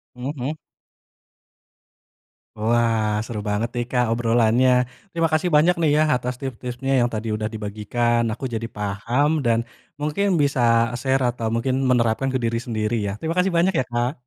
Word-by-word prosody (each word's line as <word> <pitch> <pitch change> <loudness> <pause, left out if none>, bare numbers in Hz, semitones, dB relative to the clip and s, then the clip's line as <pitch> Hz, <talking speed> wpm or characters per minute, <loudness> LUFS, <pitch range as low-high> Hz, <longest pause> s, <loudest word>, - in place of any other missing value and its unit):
Hmm 125 +3 -4
hmm. 130 +3 -2 2.1
Wah, 115 -1 +2 0.2
seru 110 -2 -5
banget 105 +3 0
nih, 120 0 -1
Kak, 125 -1 +2
obrolannya. 120 +1 +3 0.4
Terima 165 -1 +1
kasih 155 +3 +2
banyak 170 +4 +5
nih 160 - +3
ya, 155 - +4
atas 125 0 -3
tips-tipsnya, 130 0 -4
yang 120 - +2
tadi 110 +1 -3
udah 110 0 -2
dibagikan. 110 +3 -1
Aku 125 - -6
jadi 115 0 -3
paham, 105 +7 0 0.2
dan 115 -1 +3 0.4
mungkin 150 +7 0 0.2
bisa 140 -3 +1 0.4
share 135 +1 +1
atau 115 -2 -3
mungkin 130 +3 0
menerapkan 120 0 +2
ke - - 0
diri 115 0 0
sendiri, 110 -1 -1
ya. - - -2
Terima 160 +1 -2
kasih 185 +1 +2
banyak 180 +3 +3
ya, - - -1
Kak. 120 +2 0
120 Hz, 160 wpm, -22 LUFS, 115-135 Hz, 2.1 s, banyak